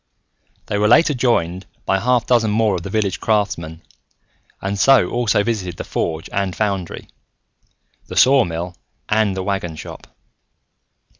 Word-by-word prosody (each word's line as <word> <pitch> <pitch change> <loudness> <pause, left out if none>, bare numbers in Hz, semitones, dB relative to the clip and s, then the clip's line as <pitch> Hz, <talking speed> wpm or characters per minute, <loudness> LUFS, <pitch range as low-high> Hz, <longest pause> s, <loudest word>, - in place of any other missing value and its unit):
They 100 - -2
were 105 - +3
later 150 +7 +5
joined 95 -8 0 0.2
by 95 - +2
a - - -4
half 125 +1 +2
dozen 120 -3 +2
more 110 0 +2
of 90 - -2
the 100 - -7
village 100 -2 -1
craftsmen 85 -7 -1 0.8
and 100 +1 -3
so 135 -8 +5
also 120 -4 +1
visited 95 -7 -3
the - - -5
forge 80 -1 -3
and 100 -2 -1
foundry, 100 -5 -3 1.0
the - - -7
sawmill 90 -10 +3 0.3
and 105 -3 +1
the 95 - -2
wagon 95 -4 -3
shop. - - -10
100 Hz, 145 wpm, -19 LUFS, 90-110 Hz, 1.0 s, later